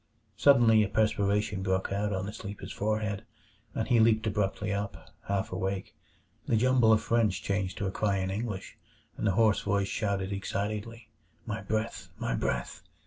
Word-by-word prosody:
Suddenly 120 -6 +6
a 105 - +1
perspiration 105 -2 +1
broke 95 0 0
out 105 +1 0
on 95 -1 -2
the 105 - -5
sleeper's 100 -2 -7
forehead, 105 0 -1 0.5
and 110 - -1
he 120 -3 +4
leaped 110 0 +4
abruptly 105 0 -1
up, 100 0 -5 0.2
half 100 -1 -1
awake. 95 +1 -3 0.5
The 115 - +3
jumble 125 -1 +4
of 110 0 +4
French 105 -7 +1
changed 100 -1 -1
to 100 - -2
a 95 - -1
cry 100 -1 0
in 95 0 -1
English, 100 -1 -4 0.4
and - - -1
the 100 - +3
hoarse 110 0 +3
voice 100 -1 0
shouted 100 -2 -1
excitedly, 105 +4 -4 0.4
"My 110 +1 -3
breath, 105 -2 -3
my - - -2
breath!" - - -2
105 Hz, 165 wpm, -29 LUFS, 100-110 Hz, 0.5 s, Suddenly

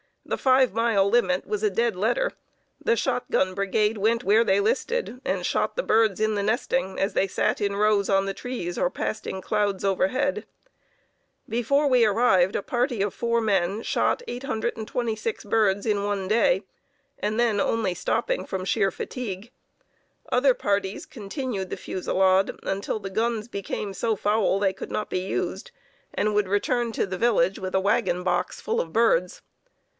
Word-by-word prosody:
The - - -2
five 260 -3 +3
mile 225 -3 +2
limit 190 -5 +2
was 210 -1 -3
a 215 - +2
dead 230 +3 0
letter. 240 - 0 0.5
The 230 - +2
shotgun 245 -6 0
brigade 210 +3 0
went 225 +4 +1
where 215 +2 +4
they 195 -3 +2
listed, 265 - -1
and - - -1
shot - - 0
the - - -1
birds 220 - +2
in 215 0 +1
the 200 - 0
nesting 215 -1 -1
as 195 - 0
they 195 - +2
sat - - 0
in 200 -1 -1
rows 205 -1 +2
on 195 -1 +3
the 195 - -2
trees 195 -8 -5
or - - +1
passed 215 +3 -4
in 190 - -4
clouds 205 -1 -1
overhead. 225 +9 0 1.0
Before 245 +6 +1
we 250 -4 +4
arrived, 195 -4 +3
a - - 0
party 245 -3 -1
of 200 -1 0
four 235 0 0
men 200 0 0
shot - - 0
826 225 -2 -3
birds 205 -2 +2
in 205 -2 +1
one 200 -2 -2
day 210 -2 +3 0.6
and 215 +2 -1
then 230 -4 +2
only 205 -2 0
stopping - - -1
from 190 -1 -4
sheer 195 +1 +2
fatigue. 220 -1 -6 0.8
Other 260 +1 +4
parties 200 -1 -1
continued 210 -3 -5
the - - -4
fusillade 190 +1 +1
until 195 +2 -2
the 195 -2 -7
guns 225 +1 -1
became 200 -2 -4
so 220 +3 0
foul 205 -1 +1
they 195 -2 +1
could 190 - -8
not 210 - -2
be - - -1
used, 195 - -3 0.4
and 210 0 0
would 205 -2 +2
return 230 +4 0
to - - 0
the 190 -1 -5
village 195 -4 +2
with 185 0 -4
a 190 - +3
wagon 180 -2 +1
box 175 -1 -1
full 460 +1 -1
of - - -3
birds. - - +2
210 Hz, 170 wpm, -25 LUFS, 195-235 Hz, 1.0 s, where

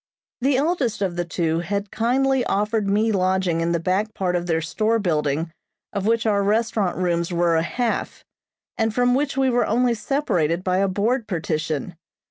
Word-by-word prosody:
The 265 +1 +2
eldest 275 - 0
of 180 -3 -1
the 175 0 -2
two 165 -1 -1
had 200 +3 -3
kindly 260 +3 +1
offered 210 +1 0
me 215 +3 +2
lodging 185 -3 +1
in 165 +1 0
the 170 - +1
back 195 +5 -1
part 180 -2 -1
of 175 0 -2
their 165 -1 +1
store 215 +8 0
building 160 -4 -1 0.4
of 200 0 -2
which 230 0 +2
our 205 -2 +2
restaurant 210 -2 0
rooms 170 -1 0
were 170 -1 +2
a 160 - +3
half, 235 +7 -2 0.5
and 225 0 +2
from 245 0 +3
which 280 +1 0
we 265 -1 +3
were 245 - +2
only 240 +2 +2
separated 185 - 0
by 185 -1 +1
a 195 - +2
board 215 +5 0
partition. 160 -2 -2
200 Hz, 180 wpm, -22 LUFS, 170-230 Hz, 0.5 s, a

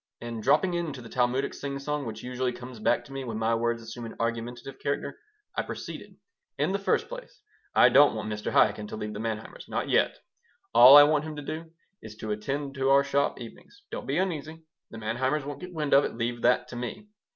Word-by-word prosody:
And 115 -1 -6
dropping 150 - +3
into 165 -6 -3
the 115 -2 -10
Talmudic 125 +3 0
singsong, 140 0 -4
which 110 0 -7
usually 125 0 -2
comes 125 -1 -9
back 120 +2 +1
to 135 - -12
me 135 0 -4
when 115 -4 -4
my 110 +1 +1
words 115 0 0
assume 115 +2 -8
an - - -10
argumentative 120 +3 -4
character, 140 - -3 0.4
I - - +1
proceeded - - -8 0.4
"In - - +1
the 200 - 0
first 195 - +1
place, - - -10 0.3
I - - +7
don't 145 -3 +6
want 105 -1 -4
Mr. 105 0 -3
Chaikin 105 0 +3
to - - -6
leave 105 0 -5
the 105 - -6
Manheimers 110 -1 -5
not - - -2
yet. - - +2 0.6
All 125 +4 +10
I 145 - +11
want 150 0 +2
him 155 -1 -6
to 145 - -6
do 160 +3 -6 0.3
is 110 -1 -10
to 110 0 -5
attend 135 +7 -3
to 135 -1 0
our 140 0 +6
shop 140 0 0
evenings. 125 - -12
Don't - - -6
be - - 0
uneasy: 160 -3 -3 0.3
the 115 - -10
Manheimers 130 +6 -1
won't 145 +2 -6
get 180 0 -8
wind 155 -4 -2
of 140 - +7
it. - - -3
Leave 120 +1 -2
that 125 0 +3
to - - -8
me. 125 +12 -6
130 Hz, 220 wpm, -27 LUFS, 115-145 Hz, 0.6 s, I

